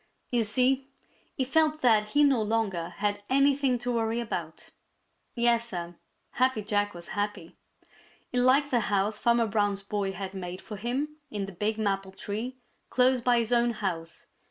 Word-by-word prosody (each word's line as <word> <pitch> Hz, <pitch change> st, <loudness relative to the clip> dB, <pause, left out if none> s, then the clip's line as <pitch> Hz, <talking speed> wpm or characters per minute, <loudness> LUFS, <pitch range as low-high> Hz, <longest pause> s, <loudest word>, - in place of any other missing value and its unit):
You 240 Hz, -2 st, +2 dB
see, 255 Hz, +5 st, +2 dB, 0.5 s
he 265 Hz, -, 0 dB
felt 310 Hz, +3 st, +2 dB
that 220 Hz, -4 st, +4 dB
he 290 Hz, +5 st, +4 dB
no 270 Hz, -5 st, +4 dB
longer 210 Hz, -6 st, -1 dB
had 205 Hz, +2 st, -2 dB
anything 275 Hz, -1 st, +3 dB
to 245 Hz, +1 st, -3 dB
worry 225 Hz, 0 st, 0 dB
about. 235 Hz, -2 st, -5 dB, 0.6 s
Yes, 235 Hz, -1 st, +2 dB
Sir, 175 Hz, -4 st, -5 dB, 0.4 s
Happy 255 Hz, -4 st, +1 dB
Jack 205 Hz, -2 st, 0 dB
was 170 Hz, 0 st, -9 dB
happy. 205 Hz, 0 st, -3 dB, 0.8 s
He 250 Hz, -, +1 dB
liked 270 Hz, +3 st, +4 dB
the 245 Hz, -, +3 dB
house 210 Hz, 0 st, 0 dB
Farmer 235 Hz, -1 st, +3 dB
Brown's 205 Hz, -2 st, 0 dB
boy 200 Hz, -1 st, -2 dB
had 190 Hz, 0 st, -6 dB
made 180 Hz, -1 st, -6 dB
for 210 Hz, -, -8 dB
him 270 Hz, +8 st, -3 dB
in 205 Hz, -2 st, -3 dB
the 195 Hz, -, -8 dB
big 210 Hz, +4 st, -2 dB
maple 195 Hz, -3 st, -1 dB
tree 225 Hz, +7 st, -5 dB, 0.3 s
close 255 Hz, 0 st, +3 dB
by 245 Hz, 0 st, +3 dB
his 235 Hz, 0 st, +1 dB
own 240 Hz, 0 st, +3 dB
house. 170 Hz, -6 st, -4 dB
225 Hz, 165 wpm, -28 LUFS, 205-250 Hz, 0.8 s, that